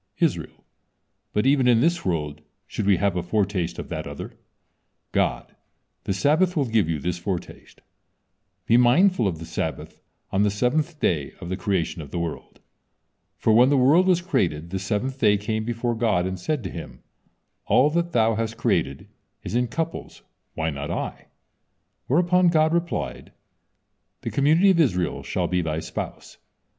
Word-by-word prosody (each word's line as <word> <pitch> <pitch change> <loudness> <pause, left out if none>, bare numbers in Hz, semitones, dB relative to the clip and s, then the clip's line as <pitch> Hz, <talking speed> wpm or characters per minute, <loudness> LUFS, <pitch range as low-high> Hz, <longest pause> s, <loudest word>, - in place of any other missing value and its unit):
Israel: - - -1 0.7
"But 105 - 0
even 135 -2 +4
in 120 -2 +5
this 170 +6 +1
world 75 -5 -2 0.2
should 105 - -4
we 100 -3 +5
have 100 0 +1
a 90 - 0
foretaste 95 -1 -1
of - - -7
that - - -4
other." - - -7 0.8
God: - - -1 0.5
"The 95 - 0
Sabbath 160 - +2
will 145 - +2
give 110 -8 +1
you 80 - 0
this 90 +4 -3
foretaste. 90 0 -6 0.8
Be 115 - +4
mindful 125 - +4
of 85 -4 -2
the 80 - -8
Sabbath - - -5 0.3
on 95 - +1
the 105 - +3
seventh 145 - 0
day 75 - 0
of 85 - -7
the 95 - -1
creation 90 -4 -1
of 75 - -9
the - - -5
world." 85 -2 -5 0.8
For 110 - +2
when 125 +4 +6
the 145 - +3
world 150 +9 +5
was 180 -2 +3
created, 85 - -1
the 95 - -2
seventh 105 +8 -2
day 105 -4 +4
came 110 +2 -3
before 120 +1 -1
God, 110 -6 +1
and 95 0 -4
said 145 +6 -2
to 95 - -5
Him: 85 - -9 0.6
"All 145 +4 +4
that 170 +1 0
Thou 115 -3 +3
has 115 +1 -2
created 70 -10 -1 0.4
is - - -6
in 125 +1 +1
couples, 165 +6 -5 0.3
why 80 0 -1
not 70 0 -5
I?" - - -4 0.8
Whereupon 175 +5 +3
God 160 -1 +3
replied, 170 0 -3 0.9
"The - - -4
community 160 +8 +4
of 175 - +2
Israel 90 - +1
shall - - -2
be 90 -1 0
thy 80 -1 -2
spouse." - - -7
110 Hz, 170 wpm, -24 LUFS, 90-145 Hz, 0.9 s, when